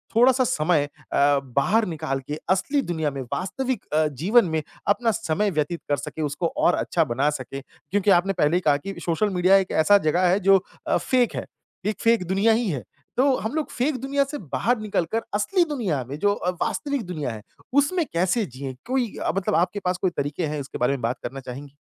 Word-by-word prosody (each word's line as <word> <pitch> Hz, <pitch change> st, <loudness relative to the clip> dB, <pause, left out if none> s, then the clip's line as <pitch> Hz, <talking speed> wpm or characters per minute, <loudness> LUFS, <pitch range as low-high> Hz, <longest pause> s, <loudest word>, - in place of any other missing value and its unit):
थोड़ा-सा 255 Hz, +2 st, +5 dB
समय 155 Hz, -, +2 dB
अ, 145 Hz, 0 st, +1 dB
बाहर 160 Hz, -, +1 dB
निकाल 155 Hz, -5 st, -3 dB
के 150 Hz, +1 st, -4 dB
असली 195 Hz, +10 st, +2 dB
दुनिया 160 Hz, -, -2 dB
में, 135 Hz, -1 st, -5 dB
वास्तविक 260 Hz, +7 st, -2 dB
अ, 155 Hz, 0 st, +3 dB
जीवन 180 Hz, -, +3 dB
में 160 Hz, 0 st, 0 dB, 0.3 s
अपना 225 Hz, +3 st, +2 dB
समय 210 Hz, -1 st, 0 dB
व्यतीत 155 Hz, +1 st, -1 dB
कर 145 Hz, -, +2 dB
सके 145 Hz, +3 st, -6 dB
उसको 150 Hz, +3 st, -1 dB
और 175 Hz, -, +4 dB
अच्छा 165 Hz, -, +1 dB
बना 135 Hz, +1 st, +1 dB
सके, 135 Hz, -1 st, -5 dB
क्योंकि 195 Hz, +8 st, -1 dB
आपने 190 Hz, +2 st, +3 dB
पहले 170 Hz, -2 st, +2 dB
ही -, -, -1 dB
कहा 145 Hz, -1 st, +5 dB
कि 195 Hz, +7 st, -7 dB
सोशल 175 Hz, +5 st, +1 dB
मीडिया 185 Hz, +1 st, +4 dB
एक 190 Hz, -1 st, -1 dB
ऐसा 205 Hz, +5 st, +7 dB
जगह 180 Hz, +4 st, +3 dB
है 185 Hz, +3 st, +3 dB
जो 195 Hz, -1 st, +4 dB, 0.2 s
अ, -, -, +3 dB
फेक 245 Hz, +7 st, +1 dB
है, -, -, -3 dB, 0.4 s
एक 210 Hz, +1 st, -2 dB
फेक 230 Hz, -4 st, +3 dB
दुनिया 200 Hz, +5 st, +3 dB
ही 225 Hz, -1 st, 0 dB
है। 140 Hz, -, -3 dB, 0.3 s
तो 265 Hz, +1 st, +4 dB
हम 220 Hz, -, -4 dB
लोग 310 Hz, -1 st, -1 dB
फेक 260 Hz, +3 st, 0 dB
दुनिया 280 Hz, +1 st, +1 dB
से 295 Hz, -, -3 dB, 0.2 s
बाहर 245 Hz, +1 st, +2 dB
निकल 210 Hz, -5 st, -1 dB
कर 225 Hz, -, 0 dB
असली 280 Hz, -, +2 dB
दुनिया 215 Hz, -, -2 dB
में 140 Hz, -, -5 dB
जो 205 Hz, +2 st, +3 dB
अ, 180 Hz, -, -2 dB
वास्तविक 280 Hz, -4 st, -1 dB
दुनिया 150 Hz, -8 st, -3 dB
है, 110 Hz, -, -8 dB, 0.3 s
उसमें 300 Hz, +5 st, +2 dB
कैसे 185 Hz, +6 st, +1 dB
जिए? 130 Hz, -1 st, -7 dB
कोई 250 Hz, -3 st, -1 dB
अ, -, -, -1 dB
मतलब 195 Hz, -, 0 dB
आपके 180 Hz, +4 st, +1 dB
पास 180 Hz, 0 st, +1 dB
कोई 185 Hz, -, +2 dB
तरीके 145 Hz, +4 st, -1 dB
हैं 150 Hz, 0 st, -3 dB
उसके 135 Hz, -, -7 dB
बारे 125 Hz, +3 st, +2 dB
में 135 Hz, -, -4 dB
बात 120 Hz, +2 st, -1 dB
करना 135 Hz, +2 st, -5 dB
चाहेंगी? 135 Hz, +2 st, -9 dB
180 Hz, 215 wpm, -24 LUFS, 145-225 Hz, 0.4 s, ऐसा